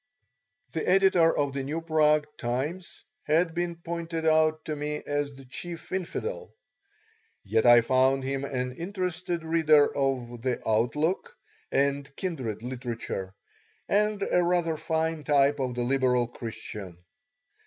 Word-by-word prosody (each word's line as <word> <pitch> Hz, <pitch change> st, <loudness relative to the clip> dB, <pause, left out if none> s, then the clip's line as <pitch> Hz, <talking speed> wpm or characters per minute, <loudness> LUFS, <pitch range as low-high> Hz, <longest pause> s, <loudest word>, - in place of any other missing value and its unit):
The 160 Hz, -, -2 dB
editor 185 Hz, -3 st, +4 dB
of 145 Hz, -2 st, 0 dB
the 135 Hz, -, -2 dB
New 145 Hz, +5 st, -3 dB
Prague 155 Hz, -2 st, +3 dB
Times 145 Hz, +10 st, -3 dB, 0.2 s
had 165 Hz, +2 st, +2 dB
been 175 Hz, 0 st, -2 dB
pointed 165 Hz, -1 st, -4 dB
out 155 Hz, 0 st, +3 dB
to 155 Hz, -, -3 dB
me 150 Hz, 0 st, -3 dB
as 145 Hz, -1 st, -2 dB
the 135 Hz, 0 st, -13 dB
chief 170 Hz, +6 st, -7 dB
infidel, 455 Hz, -, -4 dB, 0.9 s
yet 110 Hz, +4 st, +2 dB
I 120 Hz, 0 st, +9 dB
found 130 Hz, +2 st, +2 dB
him 135 Hz, +1 st, -2 dB
an 125 Hz, -2 st, -2 dB
interested 180 Hz, -1 st, -3 dB
reader 155 Hz, -3 st, +4 dB
of 125 Hz, -4 st, -1 dB
The 125 Hz, 0 st, -1 dB
Outlook 150 Hz, -, 0 dB, 0.3 s
and 140 Hz, 0 st, +1 dB
kindred 130 Hz, -, -4 dB
literature, 120 Hz, -6 st, -5 dB, 0.5 s
and 210 Hz, 0 st, +1 dB
a 180 Hz, -, +2 dB
rather 175 Hz, -2 st, +1 dB
fine 160 Hz, 0 st, -1 dB
type 145 Hz, 0 st, +3 dB
of 130 Hz, -2 st, -2 dB
the 120 Hz, -, -1 dB
liberal 125 Hz, -1 st, +2 dB
Christian. 105 Hz, -6 st, -7 dB
150 Hz, 130 wpm, -27 LUFS, 130-165 Hz, 0.9 s, I